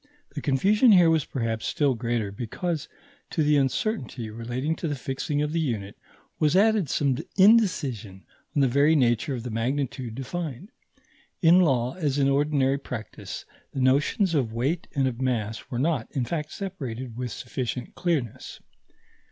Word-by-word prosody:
The 145 - -4
confusion 205 - +4
here 175 -3 +6
was 160 -3 +2
perhaps 115 -4 -2
still 145 -3 +2
greater, 115 -3 -2
because, 145 - -3 0.4
to 160 - 0
the 150 0 +3
uncertainty 135 - -1
relating 120 +7 -3
to 170 - -3
the 145 - -1
fixing 135 +3 -2
of 150 - -2
the 165 - +1
unit, 110 -10 -2 0.4
was 155 +2 +3
added 205 -5 +4
some 135 -3 +1 0.2
indecision 150 - +3 0.3
on 145 - +3
the - - +4
very 140 +5 +4
nature 125 +1 +2
of 120 - -6
the 125 - -5
magnitude 125 0 -2
defined. 160 - -5 0.7
In 170 +2 +7
law, 130 -8 +2
as 150 -6 -1
in 140 -1 +3
ordinary 140 -1 +2
practice, 125 -5 -7 0.3
the - - -3
notions 140 - +2
of 130 -8 +1
weight 135 +9 -1
and 135 -2 +2
of 125 -1 -4
mass 115 -1 -2
were 125 - -3
not, 140 -3 0
in 130 -3 -1
fact, 155 +1 -3
separated 130 - -6
with 125 -1 -4
sufficient 125 +1 -4
clearness. 155 - -2
135 Hz, 160 wpm, -26 LUFS, 120-160 Hz, 0.7 s, In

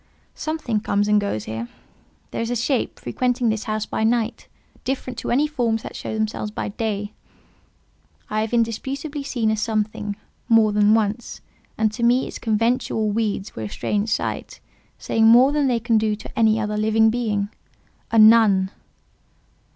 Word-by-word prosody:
"Something 310 -9 -2
comes 205 -1 0
and 210 0 +3
goes 110 - -2
here: 110 +2 -5 0.6
there - - -3
is 230 - -2
a 245 - -1
shape 245 +2 -1
frequenting 250 -1 0
this 215 -1 -2
house 215 -1 -2
by - - -2
night, 230 0 0 0.4
different 255 -1 -3
to - - -5
any 275 +5 +3
forms 240 -7 -1
that - - -8
show - - -5
themselves 215 -1 -2
by 210 - -4
day. 205 -1 -3 1.1
I 215 0 -1
have 220 - -3
indisputably 270 +6 -2
seen 240 -5 -1
a - - +1
something, 215 -1 -2 0.3
more 225 -2 +5
than 210 +1 +4
once; 220 +1 -2 0.4
and 220 -1 +2
to 235 - -7
me 245 +2 +3
its - - -8
conventual 225 -1 0
weeds 210 -2 -2
were - - -6
a 105 - -4
strange 210 - -2
sight, - - -3 0.4
saying 225 0 +2
more 245 +4 +7
than 290 -2 +1
they 245 -2 +1
can 225 -1 +2
do 215 -1 0
to 215 - -8
any 220 -1 +4
other 210 -1 -2
living 220 +1 +3
being. 210 -4 -1 0.6
A 225 - +2
nun!" 215 -4 +6
220 Hz, 165 wpm, -22 LUFS, 210-240 Hz, 1.1 s, more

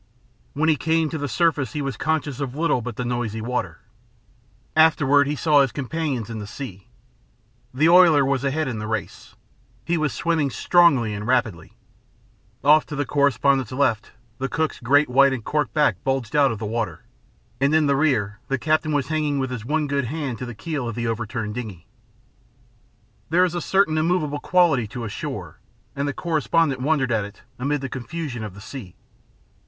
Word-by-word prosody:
When 155 +3 0
he 155 -2 +3
came 160 +1 +1
to 160 - -3
the 145 - -2
surface 140 -1 0
he 150 - -2
was 135 -1 -3
conscious 150 -4 -2
of 135 -2 -4
little 155 -5 +1
but 120 -1 -6
the 125 - -4
noisy 120 -3 -2
water. 125 +3 -3 0.9
Afterward 145 -3 +4
he 150 - -1
saw 150 -1 +4
his 135 -3 +1
companions 140 -4 -3
in 115 -2 -6
the 105 - -7
sea. 100 -6 -8 0.8
The 145 +5 +2
oiler 170 -5 +6
was 135 -1 0
ahead 145 +2 0
in 120 -4 -3
the 105 - -5
race. 110 -4 -5 0.5
He 170 +3 0
was 155 -3 0
swimming 160 -2 0
strongly 135 -7 +3
and 105 +1 -5
rapidly. 115 -10 0 0.9
Off 150 +2 +6
to 150 - -6
the 145 0 -1
correspondent's 140 -2 +2
left, 130 -4 0 0.3
the 135 +1 -2
cook's 160 -1 -2
great 145 +5 +3
white 135 +2 +4
and 125 -4 -5
corked 150 -7 -1
back 150 -1 +2
bulged 135 -1 -2
out 140 -2 +4
of 115 - -4
the 110 - -5
water, 115 +1 -3 0.6
and 140 +3 +2
in 160 -1 +4
the 140 -1 +2
rear 110 -8 0
the 135 - 0
captain 155 +3 0
was 140 -2 0
hanging 155 -2 0
with 130 -1 -2
his 125 -4 -5
one 150 +3 0
good 140 -2 -1
hand 135 -2 -4
to 125 - -5
the 120 - -7
keel 145 0 -4
of 115 - -6
the 120 0 -3
overturned 115 -1 -3
dingey. 105 -8 -7 1.4
There 180 +3 +4
is 175 - -3
a 175 - -2
certain 160 -3 +2
immovable 155 -3 0
quality 160 -9 +2
to 120 +3 -7
a 110 - -4
shore, - - -6 0.4
and 140 +1 -2
the - - 0
correspondent 160 -4 0
wondered 135 -3 +1
at 110 -2 +1
it 100 0 -11 0.2
amid 145 +2 -1
the 135 - -3
confusion 130 -1 -5
of 105 -3 -7
the 100 - -11
sea. 100 -5 -9
140 Hz, 190 wpm, -23 LUFS, 120-155 Hz, 1.4 s, oiler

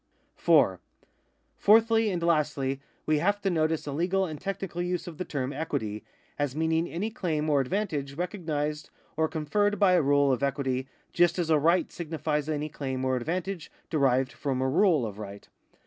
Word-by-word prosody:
4. - - +3 0.8
Fourthly 225 +1 +5
and 175 -3 -2
lastly 140 -5 +1 0.2
we 155 -1 +2
have 205 +5 +1
to 195 -1 0
notice 160 -1 0
a 145 - -4
legal 180 +6 +1
and 155 -4 -7
technical 195 -3 -4
use 180 0 -2
of 170 -3 -9
the - - 0
term 140 -4 -3
equity, 110 -10 -3 0.4
as 145 -2 -1
meaning 160 +1 +1
any 205 +7 -3
claim 160 -9 -2
or 145 -2 +3
advantage 145 -3 -2
recognised 155 -4 -3 0.3
or 160 0 +2
con 155 -1 -4
ferred 205 +6 +2
by 200 -3 +4
a 180 - +5
rule 140 -1 +3
of 130 - 0
equity, 135 -1 -1 0.3
just 175 0 +3
as 170 -3 0
a 155 - +5
right 170 +5 +2
signifies 155 -2 -2
any 150 -1 -1
claim 130 -3 -4
or 130 0 +1
advantage 170 +6 -3 0.2
derived 135 -4 +2
from 130 +2 -2
a 130 - +1
rule 155 - +3
of 105 -1 -7
right. 100 -1 -9
155 Hz, 180 wpm, -28 LUFS, 140-180 Hz, 0.8 s, Fourthly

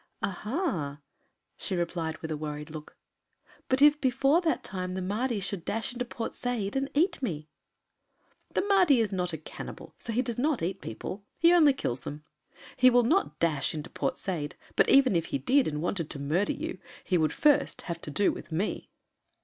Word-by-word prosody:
"Aha!" 190 - -2 0.6
she 190 - -2
replied 170 -2 -2
with 160 - -4
a - - 0
worried 150 0 -5
look, 155 -1 -9 0.7
"but 260 +2 +3
if 295 0 +6
before 275 +5 +3
that 330 -3 0
time 185 -2 -4
the - - -2
Mahdi 220 +4 -1
should 195 -2 -4
dash 225 +6 -2
into 245 0 -3
Port 230 -1 -5
Said 235 -4 -2
and 270 +1 0
eat 335 +2 +2
me." 155 - -3 1.1
"The - - +2
Mahdi 370 -10 +5
is 220 -3 +1
not 180 -2 -1
a 160 - -4
cannibal, 155 - -9
so 230 - -4
he 240 +3 +1
does 235 -1 -3
not 285 - +1
eat 190 +3 -2
people. 185 - -6
He 340 +1 +6
only 310 -5 +6
kills 130 - -2
them. 145 +4 -7 0.5
He 255 0 +6
will 245 -1 +5
not 340 - +1
dash 155 -4 +1
into 155 +2 -6
Port - - -2
Said, 160 -6 -3 0.2
but - - +4
even 270 -7 +6
if 165 -1 +1
he - - -2
did 260 - +3
and 150 0 -2
wanted 175 -3 -1
to 140 - -4
murder 160 +8 +1
you, - - -5 0.2
he 180 -2 +1
would 155 -1 +2
first 295 -2 +3
have 170 -1 -5
to - - -6
do 195 +7 +2
with - - -9
me." 180 +7 -2
200 Hz, 195 wpm, -29 LUFS, 160-260 Hz, 1.1 s, if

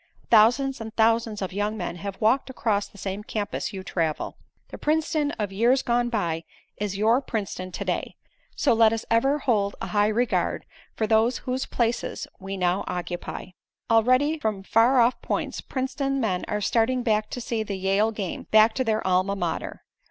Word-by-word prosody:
Thousands 245 +4 +4
and 220 0 -6
thousands 225 -2 +2
of 185 - -4
young 205 +2 -1
men 175 -2 -4
have 195 +1 -6
walked 250 +6 +2
across 215 -5 0
the - - -18
same 195 +1 -4
campus 210 -1 -3
you 190 -2 -6
travel. 165 -4 -2 0.3
The - - -9
Princeton 305 -1 +1
of 205 -3 -3
years 240 +7 +3
gone 240 0 +1
by, 170 -8 -1 0.3
is 200 -2 -3
your 225 +5 +3
Princeton 195 -7 -4
to - - -5
day, - - -2 0.4
so 275 - +3
let 225 -1 +5
us 225 - -3
ever 270 +6 +3
hold 210 -8 0
a - - -4
high 205 0 +4
regard 230 +3 0 0.3
for 220 - 0
those 225 +3 +3
whose 255 +1 -2
places 235 -1 -1
we 195 0 -5
now 180 +1 +1
occupy. 175 0 -5 0.4
"Already 255 +7 +3
from 215 -7 -2
far 235 +6 +4
off 240 +1 +3
points, - - -2
Princeton 275 +1 -2
men 190 -7 -1
are 210 - -2
starting 245 +4 +1
back 215 -2 +1
to - - -5
see 230 -1 -2
the 205 -2 -4
Yale 195 +3 +2
game 205 -5 -5
back 220 +1 +6
to 260 - 0
their 220 -2 0
Alma 185 +2 +2
Mater. 175 -4 -4
220 Hz, 180 wpm, -25 LUFS, 200-245 Hz, 0.4 s, back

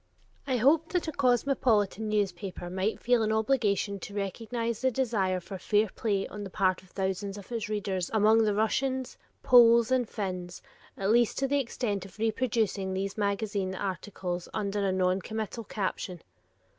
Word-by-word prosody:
I 260 -2 +1
hoped 310 +8 +3
that 360 -2 0
a - - -1
cosmopolitan 245 -6 +1
newspaper 190 -3 -2
might 190 +4 -1
feel 245 -1 +2
an 215 0 +1
obligation 215 -3 +1
to 200 +2 -8
recognize 230 +3 -3
the 260 - +3
desire 215 -8 0
for 190 +1 -8
fair 210 +3 +2
play 200 -3 0
on 210 0 -7
the 195 - -6
part 185 -1 +1
of 185 - -21
thousands 195 +1 -3
of 200 +3 -11
its 225 -3 -3
readers 195 -4 -2
among 220 +1 +4
the 210 -2 +1
Russians, 260 +4 0 0.3
Poles, 235 -1 +6
and 250 -3 +2
Finns, 180 -3 -5 0.3
at 195 +1 0
least 235 0 +3
to 270 - +1
the 285 +1 +2
extent 230 -6 -2
of 195 0 -13
reproducing 215 -4 0
these 195 +1 -2
magazine 200 -2 -1
articles 185 -2 -4
under 205 -1 -1
a 195 - +1
noncommittal 195 +5 -1
caption. 185 -3 -4
210 Hz, 160 wpm, -29 LUFS, 195-235 Hz, 0.3 s, Poles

